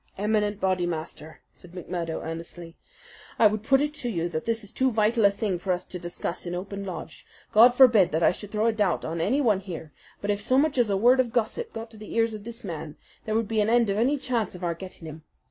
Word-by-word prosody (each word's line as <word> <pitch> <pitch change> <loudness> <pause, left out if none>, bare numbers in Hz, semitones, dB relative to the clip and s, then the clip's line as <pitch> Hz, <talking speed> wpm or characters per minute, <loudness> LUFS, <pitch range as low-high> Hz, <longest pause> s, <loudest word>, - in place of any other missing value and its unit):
"Eminent 210 0 0
Bodymaster," 175 -4 -3
said 180 -1 -16
McMurdo, 175 -2 -4
earnestly, 165 +1 -7 0.6
"I 230 - +5
would 215 0 +3
put 270 +5 +3
it 295 0 -1
to 255 -5 -4
you 170 -5 -2
that 160 -2 -4
this 230 -1 -1
is 205 - -10
too 260 0 +2
vital 220 -1 +2
a - - +8
thing 200 -3 -2
for 185 +1 -2
us 180 0 -1
to 180 - -7
discuss 175 0 -4
in 175 - -3
open 200 +2 -5
lodge. 185 -3 -7 0.3
God 235 +3 +7
forbid 230 -8 +6
that 160 +2 0
I - - +6
should 205 +3 -8
throw 215 +1 0
a 230 - +3
doubt 205 -6 0
on 165 +1 -3
anyone 225 - +2
here; 165 -5 -8 0.3
but 205 - -1
if 205 0 -2
so 255 +5 +2
much 285 -1 +2
as 235 -3 +3
a 195 - +1
word 245 +5 +5
of 245 -3 +2
gossip 250 - -1
got 225 0 -7
to 220 - -12
the 215 0 -9
ears 230 -1 +2
of 210 -1 -8
this 235 +1 -7
man, 155 -2 -6 0.3
there 215 - -1
would 225 -1 +1
be 220 0 +1
an 210 - +1
end 235 -3 +3
of 200 - -1
any 270 +6 +2
chance 235 -8 -2
of 180 - -10
our 170 -1 0
getting 185 -1 -11
him. 155 +1 -9
205 Hz, 250 wpm, -26 LUFS, 175-230 Hz, 0.6 s, a